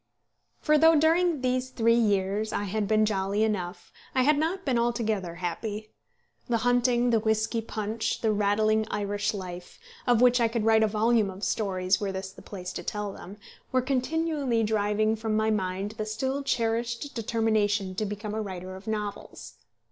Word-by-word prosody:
For 305 -1 +3
though 325 +1 +6
during 325 0 +3
these 255 0 0
three 230 -2 +2
years 205 -1 +1
I 205 - -1
had 205 +1 -2
been 215 0 +3
jolly 200 0 0
enough, 195 -4 -3 0.2
I 260 - +4
had 300 +3 +4
not 350 +5 -1
been 255 -4 +2
altogether 220 -7 -1
happy. 210 +5 -4 0.6
The 235 - +2
hunting, 245 0 +3
the 225 - +4
whisky 220 +1 0
punch, 220 0 -3
the 220 - +2
rattling 215 +1 +2
Irish 205 0 -1
life, 180 -3 -7 0.3
of 240 -2 +4
which 245 0 +5
I 230 - +4
could 225 -1 -2
write 220 0 +5
a 220 - +4
volume 220 0 +2
of 190 +2 -9
stories 185 -2 0
were 200 -1 -1
this 190 0 -5
the - - -14
place 185 -2 -7
to - - -5
tell 210 -1 -3
them, 195 +2 -10 0.3
were 255 -1 +2
continually 275 -2 0
driving 215 0 +1
from 220 -1 -1
my 220 0 +2
mind 195 0 -2
the 215 - -1
still 265 +6 -2
cherished 235 +1 -1
determination 215 -4 0
to 200 - -2
become 210 +1 -4
a 220 - -2
writer 185 -2 -6
of 190 +3 -12
novels. 210 -2 -5
220 Hz, 175 wpm, -27 LUFS, 205-240 Hz, 0.6 s, though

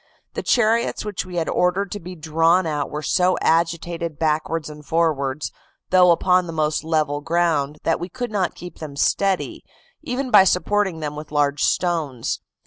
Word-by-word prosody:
The - - -3
chariots 230 -1 +1
which 205 -3 -4
we 180 - -8
had 165 -2 -1
ordered 180 +2 +1
to 205 - -4
be 180 0 -9
drawn 165 +3 +2
out 150 -3 -2
were 150 +1 -5
so 180 +2 +2
agitated 170 -1 0
backwards 160 0 -1
and 150 0 -10
forwards, 150 -3 0 0.4
though 180 -1 +6
upon 180 +1 +3
the - - -5
most 155 -1 0
level 155 -2 0
ground, 160 -3 0
that 165 - +1
we 175 - -5
could 245 0 -5
not 195 -4 -1
keep 180 -1 -10
them 150 -3 -7
steady, 195 +6 0 0.4
even 265 -3 -3
by 205 -3 +8
supporting 190 -2 +1
them 150 -1 -4
with 150 0 -8
large 145 -1 +1
stones. 160 -9 0
165 Hz, 170 wpm, -22 LUFS, 150-185 Hz, 0.4 s, by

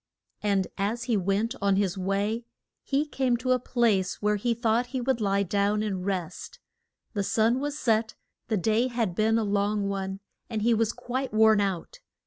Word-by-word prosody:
And 200 -2 +1
as 220 +4 -1
he 235 -1 0
went 200 +4 0
on 200 -1 +3
his 195 -2 +1
way 200 +4 -1 0.4
he 280 +2 0
came 260 -4 0
to 255 +2 -1
a 255 - +4
place 225 -7 +1
where 210 0 +1
he 235 +3 0
thought 235 +1 +1
he 260 +1 -3
would 250 -1 0
lie 200 -1 +2
down 205 +2 +1
and 195 -4 -2
rest. 185 -4 -4 0.6
The 205 - -1
sun 225 +5 +2
was 290 +1 -3
set, 225 -5 +1 0.3
the 220 - 0
day 220 +6 +2
had 235 -7 -1
been 220 +4 +2
a 225 - +1
long 205 0 0
one, 195 -1 -3 0.3
and 220 -3 -2
he 235 +1 +4
was 225 0 +2
quite 260 +2 -4
worn 220 -1 +5
out. 190 -4 -3
215 Hz, 185 wpm, -27 LUFS, 200-235 Hz, 0.6 s, worn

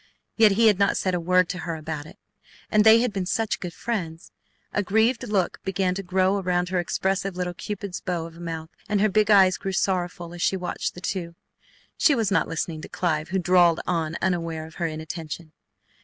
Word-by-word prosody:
Yet 220 -3 +6
he 225 +3 +3
had 210 -3 +5
not 200 - +3
said 185 - 0
a 180 - 0
word 180 +1 +3
to 180 - -4
her 170 -2 -4
about 155 -1 -6
it! - - -14 0.5
And 210 0 +5
they 220 +1 +7
had 245 -4 0
been 190 -2 -2
such 220 +2 -1
good 180 - -5
friends! 170 -7 -4 0.4
A 205 - +1
grieved 220 +5 +1
look 195 -4 0
began 190 -1 0
to 195 - -4
grow 190 +1 +1
around 180 -1 0
her 185 -1 0
expressive 190 +2 -1
little 180 -1 -2
cupid's 200 0 -5
bow 175 -3 -2
of 165 0 -11
a - - -13
mouth, 165 -1 -6 0.2
and 210 -1 +1
her 215 +2 +3
big 210 +1 +2
eyes 190 -3 +6
grew 195 - -4
sorrowful 180 -2 -1
as 175 - -8
she 190 - +2
watched 180 -1 -3
the 180 - -9
two. 175 -2 -4 0.6
She 290 - +5
was 225 -5 0
not 205 - +2
listening 160 -1 -3
to - - -9
Clive, 160 -3 -1
who 190 - 0
drawled 175 -2 +4
on 165 -2 -1
unaware 165 -3 -1
of 160 - -13
her 170 - +2
inattention. 160 0 -6
180 Hz, 215 wpm, -25 LUFS, 170-195 Hz, 0.6 s, they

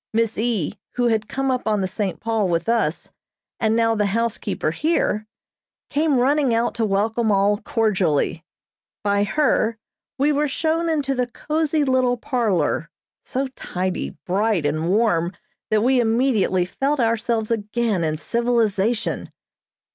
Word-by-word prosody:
Miss 225 0 +1
E., 220 -5 -1 0.2
who 245 -1 +2
had 220 -2 0
come 270 0 -1
up 255 -2 -2
on 210 -2 +1
the 190 - 0
"St. 195 -1 -3
Paul" 225 -4 0
with 170 0 0
us, 225 -9 0 0.5
and 220 -1 +2
now 230 0 +3
the 210 -2 +1
housekeeper 215 -5 -1
here, 215 - 0 0.6
came 295 -1 +2
running 265 -1 +2
out 235 +1 +1
to 230 -1 0
welcome 215 +3 +1
all 200 +1 +3
cordially. 190 - 0 0.6
By 200 0 +2
her 230 -2 +1 0.4
we 285 +3 +3
were 295 +1 +1
shown 325 +4 0
into 290 -4 0
the 250 -2 0
cozy 305 +4 -1
little 255 -2 +2
parlor, 215 - 0 0.4
so 265 +2 -2
tidy, 185 -7 -4
bright 195 -2 +1
and 155 +3 0
warm 190 -4 +2 0.4
that 215 0 +2
we 255 +1 +3
immediately 225 -6 +2
felt 275 +10 -1
ourselves 230 -1 0
again 215 -3 0
in 155 -1 -1
civilization. 230 +1 0
225 Hz, 140 wpm, -22 LUFS, 200-250 Hz, 0.6 s, now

